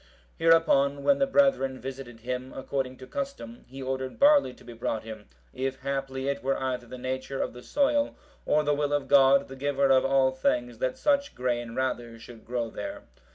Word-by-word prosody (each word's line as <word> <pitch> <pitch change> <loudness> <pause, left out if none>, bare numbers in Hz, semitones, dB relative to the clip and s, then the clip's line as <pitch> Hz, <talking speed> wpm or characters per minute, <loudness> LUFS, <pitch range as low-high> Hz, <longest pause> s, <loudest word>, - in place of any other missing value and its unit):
Hereupon, 145 -4 +4
when 280 0 +4
the 275 - +3
brethren 270 - +2
visited 130 -3 -8
him 125 +2 -4
according 130 -1 -3
to 130 - -10
custom, 275 - -6
he 135 +1 -8
ordered 130 0 -3
barley 285 - +5
to - - -17
be 120 - -10
brought 115 -1 -3
him, 110 -2 -9 0.3
if 130 0 -3
haply 135 0 -3
it 140 -5 -1
were 135 +2 0
either 125 -2 -3
the 130 - -8
nature 130 +2 -4
of - - -2
the 125 - -10
soil, 285 - +1 0.3
or 150 +1 +2
the 150 0 +2
will 145 0 0
of 145 -1 0
God, 140 0 +5
the 135 - -9
Giver 140 0 +1
of 130 -1 +5
all 135 -1 +3
things, 120 -2 -1
that 130 0 -1
such 285 -1 +1
grain 120 -2 -2
rather 120 -3 -2
should 115 -1 -13
grow 120 -2 -2
there. 300 0 -6
135 Hz, 195 wpm, -27 LUFS, 125-145 Hz, 0.3 s, barley